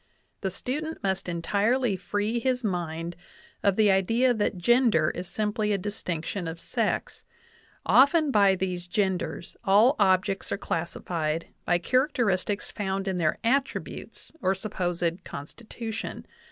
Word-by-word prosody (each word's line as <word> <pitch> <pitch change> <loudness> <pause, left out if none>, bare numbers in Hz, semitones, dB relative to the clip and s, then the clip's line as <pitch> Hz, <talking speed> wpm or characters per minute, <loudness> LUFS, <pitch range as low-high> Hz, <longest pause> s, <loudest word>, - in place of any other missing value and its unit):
The 195 - 0
student 295 - -4
must 190 -1 -1
entirely 205 +7 +1
free 205 +5 -1
his 250 -1 0
mind 170 -3 -2 0.5
of 200 -2 +3
the 210 -1 +5
idea 225 +7 +3
that 210 -4 -1
gender 225 -5 +3
is 180 +1 -6
simply 210 +2 -1
a 200 - +2
distinction 180 -2 -4
of 165 +1 -5
sex. - - -2 0.6
Often 290 +2 +5
by 200 -4 +5
these 180 -1 -3
genders 180 -4 -2
all 215 +7 +5
objects 190 +1 +2
are - - 0
classified 165 -2 -2 0.2
by 175 - +3
character 255 - +1
istics 200 +1 -1
found 195 -1 -2
in 185 -2 -1
their 155 -2 +1
attributes 265 +3 -2
or 190 +1 +2
supposed 175 -3 -2
constitution. 220 +9 -6
195 Hz, 130 wpm, -27 LUFS, 175-230 Hz, 0.6 s, the